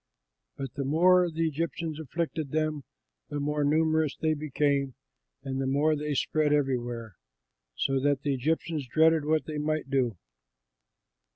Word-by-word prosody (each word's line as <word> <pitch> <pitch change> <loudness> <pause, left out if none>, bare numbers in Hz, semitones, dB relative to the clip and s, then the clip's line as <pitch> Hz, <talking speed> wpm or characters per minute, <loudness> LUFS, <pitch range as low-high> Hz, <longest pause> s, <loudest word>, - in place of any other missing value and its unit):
But 135 -2 -5
the 140 - -3
more 175 +5 +4
the 165 0 0
Egyptians 160 0 -3
afflicted 160 0 -3
them, 155 -2 -1 0.4
the 145 0 -3
more 150 +1 0
numerous 155 0 +2
they 160 -1 +1
became 145 -2 0 0.5
and 135 0 -3
the 135 - -1
more 145 +3 +2
they 150 0 -2
spread 155 +2 +1
everywhere, 120 -7 -1 0.6
so 135 - +1
that 140 0 +1
the 145 - +1
Egyptians 150 +1 -1
dreaded 160 +2 +4
what 155 0 +1
they 155 -1 -4
might 155 -2 -2
do. 125 -7 +1
150 Hz, 145 wpm, -28 LUFS, 135-155 Hz, 0.6 s, more